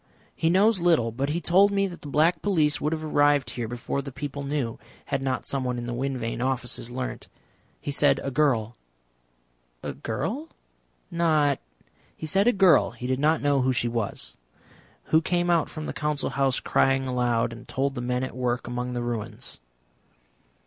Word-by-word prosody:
"He 160 - +1
knows 200 +4 +4
little, 165 -10 +3
but 135 +5 -2
he 160 +3 0
told 190 +4 +5
me 200 0 +2
that 180 -3 -7
the - - -8
Black 155 +5 +2
Police 155 -8 +2
would 150 - 0
have 160 -1 -2
arrived 145 -4 +3
here 120 -2 -4
before 120 +4 -3
the 140 0 -7
people 140 +1 -5
knew 140 -4 -2 0.3
had 135 - -1
not 130 -1 -1
someone 130 -3 -1
in 120 - -4
the 120 - -3
Wind 135 +2 -2
Vane 115 0 -3
Offices 125 -2 -2
learnt. 130 +1 -5 0.5
He 145 - -4
said 140 -1 +3
a 135 - -2
girl." 125 -6 +1 1.1
"A - - -3
girl? 235 - -3 0.6
Not 155 -4 +2 0.3
?" - - -35
"He - - -6
said 195 +7 +2
a - - +7
girl 190 -7 +5
he 120 +1 -9
did 130 +1 0
not 155 +2 +2
know 140 -2 +3
who 130 +1 +2
she 120 -1 +1
was. 115 -3 -3 0.7
Who 160 - +3
came 175 +1 +1
out 165 -3 +2
from 155 - -6
the - - -4
Council 150 -1 -2
House 135 -2 +1
crying 135 0 +2
aloud, 120 -2 +1
and 120 +1 -12
told 135 +1 -1
the 125 - -4
men 125 +1 -1
at 130 - -5
work 125 -1 -1
among 125 +1 -3
the 120 -1 -2
ruins." 115 - -5
140 Hz, 190 wpm, -26 LUFS, 125-155 Hz, 1.1 s, a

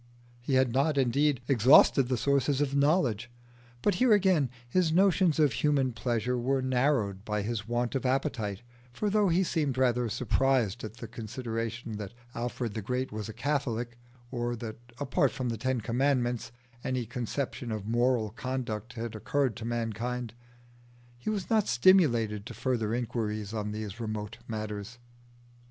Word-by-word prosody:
He 130 +3 -1
had 130 -2 +3
not, 140 +3 +2
indeed, 135 +1 +2
exhausted 135 +1 +6
the 130 -1 0
sources 140 +2 +1
of 145 -2 0
knowledge, 140 - +2 0.5
but 205 - +3
here 250 -3 +6
again 185 -9 +3 0.2
his 165 +5 +2
notions 185 -2 +4
of 150 -6 +4
human 140 -1 +2
pleasure 120 +1 -1
were 135 +3 +1
narrowed 125 -7 +1
by 105 -1 -2
his 110 -1 -3
want 120 0 -1
of 135 - -1
appetite; 125 -6 -1 0.3
for 205 - -2
though 205 -2 +3
he 175 +3 +3
seemed 150 -7 -1
rather 125 -2 +2
surprised 125 -2 +1
at 110 0 -6
the 115 - -7
consideration 115 0 -4
that 105 +1 -7 0.2
Alfred 120 -1 -3
the 110 - -3
Great 125 +5 -2
was 105 0 -5
a - - -4
Catholic, 120 -2 -2 0.4
or 120 -1 -2
that 110 -1 -6 0.2
apart 140 -3 +2
from 125 -2 -3
the 115 - -2
Ten 130 0 0
Commandments 125 0 0 0.3
any 130 -2 -1
conception 125 +1 -4
of 105 -2 -4
moral 120 -1 +1
conduct 120 -3 -4
had 115 -1 -5
occurred 130 +3 0
to 115 - -6
mankind, 120 0 -3 0.9
he 120 - -3
was 205 -4 -2
not 220 -2 +2
stimulated 120 - +3
to - - -8
further 115 -4 -1
inquiries 110 -3 -3
on 105 -1 -2
these 105 0 -5
remote 110 -1 -4
matters. 110 0 -5
120 Hz, 155 wpm, -29 LUFS, 110-135 Hz, 0.9 s, exhausted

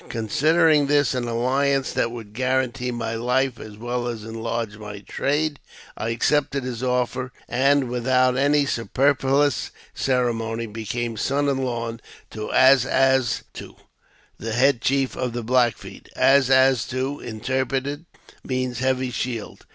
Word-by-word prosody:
Considering 150 +6 +3
this 145 -1 +3
an 125 -1 -2
alHance 135 +4 0
that - - +1
would 115 -3 -9
guarantee 130 +1 -1
my 115 -2 -3
life 125 +2 0
as 105 -1 -10
well 120 +2 -3
as 115 -3 -5
enlarge 115 -1 -4
my 105 -1 -8
trade, 145 +8 -1 0.4
I 110 - -3
accepted 140 +3 +1
his 125 -2 -5
offer, 125 0 -1 0.2
and 135 +2 +2
without 125 +1 +2
any 145 +2 +3
superfluous 135 +2 +1 0.2
ceremony, 115 -3 -1
became 115 +1 -4
son 140 +6 0
in 135 -1 0
law 115 -3 -3 0.3
to 110 0 -5
As 130 -1 +6
as 130 -2 +2
to, - - -10 0.6
the 115 +1 -4
head 125 +1 +3
chief 135 -1 0
of 125 -2 -3
the 120 -1 -4
Black 120 0 +2
Feet. - - -12
As 135 -1 +4
as 130 -2 +4
to, 130 +3 -3
interpreted, 130 +6 -3 0.4
means 130 -1 -2
heavy 130 -1 0
shield. 120 -3 -5
125 Hz, 140 wpm, -23 LUFS, 115-135 Hz, 0.6 s, As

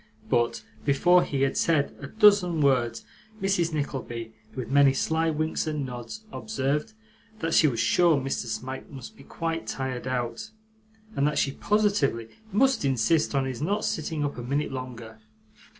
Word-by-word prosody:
But 115 -2 +1 0.2
before 175 +6 +4
he 135 -1 -1
had 135 - +1
said 155 -4 +1
a 140 - -7
dozen 200 -3 +4
words, 120 -5 +1 0.3
Mrs. 190 -4 +1
Nickleby, 125 -6 -4 0.2
with 130 -1 -5
many 140 -1 +6
sly 160 +4 +1
winks 155 +1 -1
and 150 -3 -2
nods, 125 - -7
observed, 150 0 -2 0.4
that 165 -4 -2
she 155 - +6
was 120 -5 -1
sure 165 +6 +4
Mr. 135 -2 -3
Smike 125 +4 -5
must 135 -4 -10
be 135 - -15
quite 165 +3 -4
tired 130 -2 -4
out, 120 - -3 0.7
and 140 - +2
that 150 - -1
she 135 - +2
positively 175 - +1 0.2
must 260 - +3
insist 135 +4 +2
on 135 -1 +2
his 130 -2 -4
not 200 +7 0
sitting 155 -1 -2
up 140 -3 -4
a - - -4
minute 140 +5 -1
longer. 120 -4 -7
140 Hz, 160 wpm, -26 LUFS, 125-165 Hz, 0.7 s, many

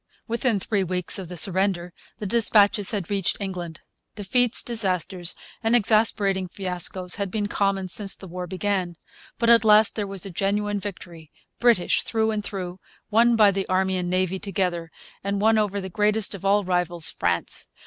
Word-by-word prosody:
Within 235 -2 0
three 200 +1 0
weeks 180 +1 -3
of 185 -3 -7
the 180 - -6
surrender 185 -1 +1 0.2
the 210 - -6
dispatches 205 -2 +3
had 205 -4 -2
reached 195 -3 0
England. 180 -5 -6 0.3
Defeats, 225 +4 0
disasters, 185 -6 -2 0.3
and 225 +1 +2
exasperating 205 -4 +2
fiascos 180 0 -2
had 200 -2 -2
been 210 +1 -2
common 195 -2 0
since 195 +2 -1
the 190 - -12
war 180 +1 -6
began. 185 -1 -2 0.4
But 235 0 +3
at 230 -1 +6
last 215 0 +5
there 210 -2 -2
was 195 -1 -3
a 195 - -6
genuine 205 +3 -1
victory, 175 -5 -9 0.3
British 235 -7 +3
through 220 -1 0
and 210 -1 -3
through, 185 -2 -5 0.3
won 235 +2 +4
by 210 -3 +6
the 195 0 -3
Army 190 0 +1
and 180 -1 -2
Navy 185 +1 0
together, 180 -4 -2 0.3
and 200 0 -1
won 220 +1 +3
over 205 -1 -1
the 190 - -5
greatest 210 +3 +1
of 195 - -9
all 200 +1 +3
rivals, 175 -2 +1
France. 85 -1 -1
195 Hz, 170 wpm, -24 LUFS, 180-210 Hz, 0.4 s, at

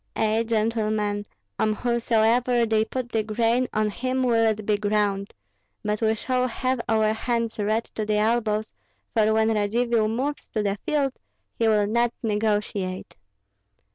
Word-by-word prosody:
Ei, 220 +1 +2
gentlemen, 215 -2 0 0.4
on 215 - +2
whomsoever 235 +1 +2
they 220 -1 +2
put 240 +2 -5
the 220 - +1
grain, 230 +3 +1
on 215 0 0
him 255 +4 -1
will 230 -2 +3
it 215 -1 -1
be 210 - +2
ground; 205 -1 0 0.5
but 210 0 -1
we 220 0 +2
shall 255 +3 0
have 255 +1 -1
our 220 -1 +3
hands 230 0 -2
red 215 +2 +1
to 215 - -5
the 210 0 0
elbows, 215 -1 0 0.4
for 220 -1 +3
when 220 0 +3
Radzivill 220 +2 +1
moves 265 +7 -3
to 215 - -1
the 200 0 -1
field, 280 -3 +1 0.4
he 230 - 0
will 210 -2 +3
not 235 +3 +1
negotiate." 210 -3 -1
220 Hz, 150 wpm, -25 LUFS, 210-235 Hz, 0.5 s, will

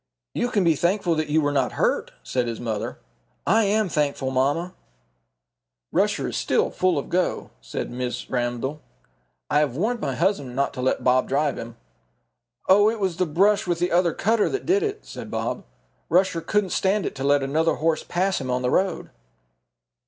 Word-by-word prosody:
"You 245 - 0
can 205 -5 +1
be 165 -2 +4
thankful 175 +2 +1
that 155 -1 -1
you 155 +2 +3
were 145 -1 +1
not 135 -3 0
hurt," - - 0
said 125 -2 -1
his 115 -1 -4
mamma. 110 -3 -3 0.5
"I 220 +4 +4
am 210 +1 +2
thankful, 145 -4 -1
mamma." 145 +8 0 1.2
"Rusher - - +1
is - - -5
still - - +1
full 185 -3 +1
of 140 - -3
go," 180 +1 -1
said - - -5
Mrs. 125 0 -4
Ramdell. 125 +4 -2 0.7
"I 145 - +4
have 145 -5 0
warned 230 +7 0
my 135 - -2
husband 145 -6 0
not 140 +1 0
to 125 - -5
let 130 - 0
Bob 130 0 +3
drive 145 +1 0
him." 115 0 -8 0.9
"Oh, 205 +3 +6
it 225 0 -3
was 190 -4 -1
the 185 -1 +1
brush 195 +6 +2
with 175 -1 +1
the 175 +1 0
other 175 0 +2
cutter 225 0 +2
that 405 - -3
did 385 +3 +3
it," 425 0 -3
said - - -8
Bob. - - -3 0.4
"Rusher 180 -2 +2
couldn't 205 +1 0
stand 195 +1 +1
it - - -3
to 135 - -6
let 140 0 +3
another 160 +4 +1
horse 160 0 0
pass 185 -1 0
him 130 - -5
on 125 0 0
the 125 - +1
road." 190 -2 0
165 Hz, 190 wpm, -24 LUFS, 135-190 Hz, 1.2 s, Oh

